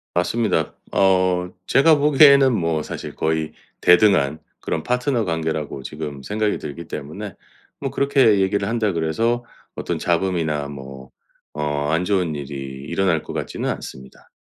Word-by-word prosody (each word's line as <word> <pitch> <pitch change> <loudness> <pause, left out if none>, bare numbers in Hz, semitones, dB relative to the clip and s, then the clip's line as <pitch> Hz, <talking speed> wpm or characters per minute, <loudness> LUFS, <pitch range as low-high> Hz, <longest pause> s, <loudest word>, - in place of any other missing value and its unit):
맞습니다. 90 -2 0 0.2
어 95 -2 +2 0.2
제가 155 +8 +5
보기에는 140 -2 +6
뭐 85 -6 0
사실 - - -7
거의 80 -1 -1 0.3
대등한 90 -6 +4 0.2
그런 80 - -3
파트너 125 -1 0
관계라고 80 -4 -3
지금 75 0 -6
생각이 105 +7 -1
들기 85 +4 -7
때문에 95 +8 -7 0.5
뭐 - - -3
그렇게 135 -7 +3
얘기를 100 +1 +1
한다 115 -2 0
그래서 110 +9 0 0.3
어떤 - - -3
잡음이나 85 -5 0
뭐 65 -2 -10 0.5
어 75 -1 -1
안 80 +2 +1
좋은 90 -4 0
일이 70 -1 -6 0.3
일어날 90 -5 +1
것 - - -9
같지는 - - -3
않습니다. 65 0 -8
90 Hz, 310 characters per minute, -21 LUFS, 75-110 Hz, 0.5 s, 보기에는